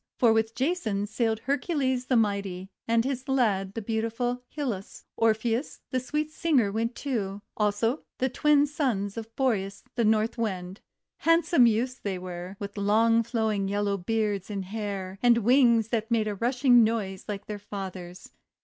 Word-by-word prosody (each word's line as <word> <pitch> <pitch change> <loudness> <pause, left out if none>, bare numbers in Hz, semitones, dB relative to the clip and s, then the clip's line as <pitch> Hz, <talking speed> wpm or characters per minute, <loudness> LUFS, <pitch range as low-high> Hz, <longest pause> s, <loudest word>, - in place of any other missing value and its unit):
For 235 -3 +5
with 225 0 0
Jason 255 - 0
sailed 220 +1 -1
Hercules 270 -3 -1
the 255 - +2
Mighty, 200 -4 0 0.2
and 230 +1 +2
his 265 0 -3
lad 200 -7 +1
the 225 - -4
beautiful 230 +3 -1 0.2
Hylas; 230 -10 -4
Orpheus 225 +3 0
the 255 - +1
sweet 300 +4 -2
singer 290 -11 +2
went 230 +3 -1
too; 205 -7 -3
also 215 +6 +1 0.2
the 260 - +1
Twin 290 +2 +3
Sons 250 -10 -1
of 225 0 -8
Boreas 200 -7 -1
the 235 - 0
North 220 +2 +2
Wind, 190 -4 -3 0.2
— - - -62
handsome 330 -6 +5
youths 245 +4 0
they 195 -2 -3
were, 180 +1 -7
with 200 +1 -7
long 225 +3 +4
flowing 220 -4 -1
yellow 200 0 0
beards 205 0 -1
and 200 -2 -4
hair, 195 -2 -5
and 240 -1 +5
wings 235 -1 +4
that 225 -1 -1
made 225 -2 +1
a 210 - -1
rushing 245 +3 +4
noise 210 -4 -1
like 205 -2 -5
their 210 -1 -6
father's. 190 -3 -8
225 Hz, 160 wpm, -27 LUFS, 200-245 Hz, 0.2 s, For